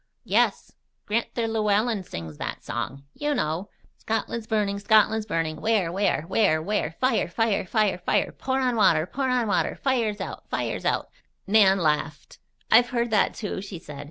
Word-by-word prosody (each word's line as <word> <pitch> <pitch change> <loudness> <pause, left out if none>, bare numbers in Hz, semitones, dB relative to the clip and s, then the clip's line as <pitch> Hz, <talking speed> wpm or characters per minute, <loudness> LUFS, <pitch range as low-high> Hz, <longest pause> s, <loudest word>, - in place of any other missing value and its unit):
"Yes. - - +1 0.3
Gran'ther 230 +1 -1
Llewellen 215 -1 +1
sings 80 - -8
that - - -5
song. 135 +2 -4
You 295 0 -1
know: 170 - -2 0.3
"'Scotland's 225 +1 -3
burning! 205 -2 0
Scotland's 215 +1 +3
burning! 165 -5 -2
Where, 215 -6 +1
where? 195 -4 0
Where, 190 -2 +2
where? 160 -2 -2
Fire! 255 +1 +2
Fire! 225 -4 0
Fire! 210 -5 +1
Fire! 180 - 0
Pour 265 0 -2
on 250 -2 +1
water! 165 -7 +4
Pour 265 +8 -2
on 250 -2 +1
water! 205 - 0
Fire's 235 -6 0
out! 190 - -7
Fire's - - -3
out!'" - - 0 0.3
Nan 195 -2 +5
laughed. 150 -3 -2 0.3
"I've 240 +2 +6
heard 235 -1 -1
that, 215 - +2
too," 205 -3 -4
she 195 -2 -7
said. 150 -3 -10
210 Hz, 160 wpm, -25 LUFS, 180-225 Hz, 0.3 s, I've